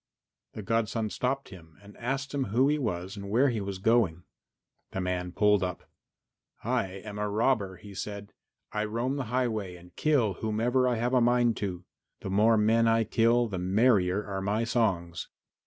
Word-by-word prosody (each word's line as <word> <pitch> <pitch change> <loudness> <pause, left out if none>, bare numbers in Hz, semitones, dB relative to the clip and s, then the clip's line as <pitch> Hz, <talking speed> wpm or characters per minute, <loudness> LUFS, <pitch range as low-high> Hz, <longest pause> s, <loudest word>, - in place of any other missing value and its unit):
The 110 - -7
godson 110 0 -1
stopped 135 +2 -2
him 80 -5 -14
and 100 0 -15
asked 135 +3 -3
him 140 -2 0
who 120 +7 +2
he 150 0 +1
was 95 -6 -3
and 100 -1 -7
where 125 +7 +3
he 115 -4 -2
was 100 -1 -4
going. 95 -5 +2 0.7
The 95 - -2
man 90 -1 -2
pulled 105 +1 +3
up. 90 -1 -4 0.8
"I 120 -3 0
am 100 +2 -8
a 105 0 -1
robber," 105 -3 +1
he 100 +3 -12
said; 100 +1 -6 0.4
"I 105 0 -1
roam 120 +6 -2
the 135 - -2
highway 110 -6 -1
and 90 0 -16
kill 135 -10 +2
whomever 120 +4 +1
I 125 - +1
have 120 +3 -1
a 125 - +4
mind 120 -1 +3
to. 90 -3 -4 0.4
The 95 - -5
more 110 +3 +4
men 115 +2 +3
I 115 0 +3
kill 115 +2 +2
the 95 -4 -4
merrier 95 0 +2
are 95 -1 -4
my 105 +4 0
songs." 95 -8 -1
110 Hz, 180 wpm, -28 LUFS, 95-120 Hz, 0.8 s, a